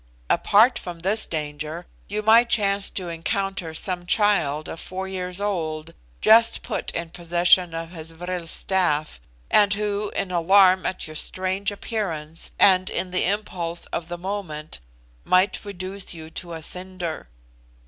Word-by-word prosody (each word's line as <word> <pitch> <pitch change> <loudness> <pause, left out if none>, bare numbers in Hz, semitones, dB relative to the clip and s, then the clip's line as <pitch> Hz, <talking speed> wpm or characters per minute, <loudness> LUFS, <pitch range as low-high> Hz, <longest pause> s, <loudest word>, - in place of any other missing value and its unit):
Apart 225 +5 +4
from 175 -2 -8
this 200 +5 +2
danger, 155 +2 -5 0.2
you 210 +1 -3
might 230 +2 +6
chance 200 -3 +2
to 185 -2 -5
encounter 175 +1 -3
some 175 +1 -1
child 160 -9 +2
of 165 - -7
four 190 +1 -5
years 180 -1 -4
old, 165 -6 -3 0.3
just 225 +1 +5
put - - -3
in 170 -1 -3
possession 175 0 +3
of 165 0 -5
his 165 -2 -6
vril 175 +1 -5
staff; 165 -4 0 0.3
and 205 -1 +5
who, 210 0 -2
in 185 - -2
alarm 185 +2 +4
at 185 - -3
your 155 - -9
strange 190 +4 -2
appearance, 170 -7 -2
and 185 -2 +5
in 185 - -3
the 185 - +1
impulse 180 -4 -2
of 165 - -3
the 175 0 -5
moment, 175 - -5 0.4
might 185 +2 +2
reduce 195 -2 -5
you 160 -1 -10
to 170 0 -7
a 160 -1 -6
cinder. 180 -2 -2
180 Hz, 150 wpm, -23 LUFS, 165-200 Hz, 0.4 s, might